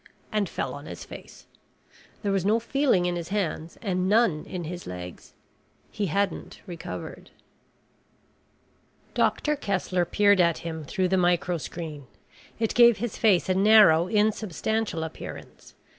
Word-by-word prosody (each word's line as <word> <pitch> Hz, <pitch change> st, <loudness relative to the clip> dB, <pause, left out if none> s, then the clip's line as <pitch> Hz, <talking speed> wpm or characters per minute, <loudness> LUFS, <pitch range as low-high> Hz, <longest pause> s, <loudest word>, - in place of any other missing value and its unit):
And 210 Hz, -4 st, 0 dB
fell 135 Hz, -, -3 dB
on 145 Hz, +1 st, -9 dB
his 85 Hz, -, -8 dB
face. -, -, -12 dB, 0.8 s
There 200 Hz, -, 0 dB
was 195 Hz, -2 st, +1 dB
no 215 Hz, +4 st, +3 dB
feeling 235 Hz, -6 st, +1 dB
in 175 Hz, 0 st, 0 dB
his 170 Hz, -1 st, -5 dB
hands 175 Hz, -5 st, -3 dB
and 185 Hz, -2 st, 0 dB
none 210 Hz, -8 st, +2 dB
in 180 Hz, -2 st, -5 dB
his 175 Hz, +2 st, -7 dB
legs. 90 Hz, -1 st, -9 dB, 0.6 s
He 205 Hz, -, -2 dB
hadn't 195 Hz, +2 st, -2 dB
recovered. 170 Hz, -2 st, -8 dB, 1.8 s
Doctor 300 Hz, 0 st, +1 dB
Kessler 190 Hz, -7 st, -1 dB
peered 205 Hz, 0 st, +4 dB
at 170 Hz, -2 st, +2 dB
him 160 Hz, -2 st, -5 dB
through 185 Hz, +3 st, -1 dB
the 190 Hz, -, +2 dB
microscreen. 170 Hz, -4 st, -1 dB, 0.5 s
It 225 Hz, -1 st, -1 dB
gave 235 Hz, -2 st, +6 dB
his 235 Hz, +1 st, -4 dB
face 200 Hz, -6 st, +3 dB
a 185 Hz, -, +2 dB
narrow 195 Hz, -4 st, +6 dB
insubstantial 215 Hz, -2 st, 0 dB
appearance. 160 Hz, -, -9 dB
185 Hz, 135 wpm, -26 LUFS, 165-210 Hz, 1.8 s, gave